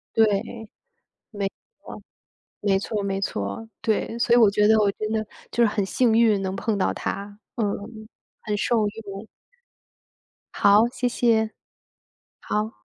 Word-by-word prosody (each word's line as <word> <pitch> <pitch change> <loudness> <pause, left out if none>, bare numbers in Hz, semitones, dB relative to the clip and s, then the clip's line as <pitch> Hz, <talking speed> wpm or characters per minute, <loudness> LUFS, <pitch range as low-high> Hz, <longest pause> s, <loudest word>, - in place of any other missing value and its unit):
对， 225 - +6 1.1
没 200 -2 -2 0.4
错。 - - -9 0.6
没 195 -2 +3
错 205 +1 -3
没 195 -1 -1
错， 100 - -3
对。 225 +1 -1
所 235 0 +3
以 - - +6
我 220 -4 +6
觉 210 +1 +3
得 220 0 +6
我 205 -2 +3
真 215 +1 -4
的 220 0 0 0.3
就 235 - +1
是 - - +5
很 205 -2 0
幸 235 +3 +2
运 220 -3 +4
能 190 0 -2
碰 210 +2 -1
到 195 - +1
他， 200 +1 -5 0.2
嗯， 230 - 0 0.8
很 210 - -2
受 220 0 +1
用。 205 -1 -8 1.3
好， 205 +3 +5
谢 245 0 -1
谢。 225 -2 +2 0.9
好。 210 - -3
210 Hz, 155 characters per minute, -24 LUFS, 200-225 Hz, 1.3 s, 对